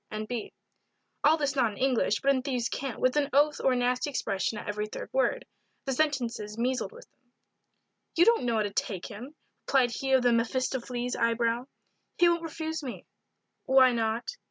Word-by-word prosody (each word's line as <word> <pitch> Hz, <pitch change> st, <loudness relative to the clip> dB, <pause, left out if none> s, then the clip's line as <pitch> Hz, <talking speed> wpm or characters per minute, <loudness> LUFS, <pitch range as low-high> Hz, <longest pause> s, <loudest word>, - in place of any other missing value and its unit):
N. 215 Hz, 0 st, -4 dB
B. 235 Hz, -1 st, -5 dB, 0.7 s
All 310 Hz, +2 st, +5 dB
this 285 Hz, -3 st, -1 dB
not 240 Hz, -6 st, +2 dB
in -, -, -12 dB
English, 255 Hz, -5 st, +1 dB
but 275 Hz, -, +4 dB
in 260 Hz, -, 0 dB
thieve's 250 Hz, -3 st, -2 dB
cant, 270 Hz, -3 st, -4 dB
with 255 Hz, +1 st, +2 dB
an 285 Hz, -1 st, +2 dB
oath 295 Hz, +2 st, +3 dB
or 265 Hz, -, +4 dB
a -, -, +1 dB
nasty 250 Hz, +3 st, 0 dB
expression 210 Hz, -5 st, -2 dB
at -, -, -7 dB
every 210 Hz, 0 st, -2 dB
third -, -, -8 dB
word. -, -, +1 dB, 0.4 s
The 270 Hz, -, -1 dB
sentences 245 Hz, -7 st, -1 dB
measled 255 Hz, -, -1 dB
with 485 Hz, +2 st, -13 dB
them. 250 Hz, -2 st, -43 dB, 0.8 s
"You 345 Hz, -, +6 dB
don't 465 Hz, -, +4 dB
know 235 Hz, -1 st, +1 dB
how 215 Hz, -, +2 dB
to 205 Hz, -, -3 dB
take 190 Hz, -5 st, -2 dB
him," 245 Hz, +8 st, -9 dB, 0.3 s
replied 255 Hz, -3 st, +3 dB
he 265 Hz, +3 st, -2 dB
of 260 Hz, -1 st, +5 dB
the 245 Hz, -1 st, +4 dB
Mephistopheles 245 Hz, +1 st, -1 dB
eye 230 Hz, 0 st, +1 dB
brow. 235 Hz, +2 st, 0 dB, 0.5 s
"He 350 Hz, -, +5 dB
won't 340 Hz, -1 st, +2 dB
refuse 320 Hz, -1 st, -4 dB
me." 260 Hz, -4 st, -7 dB, 0.6 s
"Why 260 Hz, -2 st, +6 dB
not?" 225 Hz, 0 st, -1 dB
250 Hz, 195 wpm, -28 LUFS, 230-280 Hz, 0.8 s, You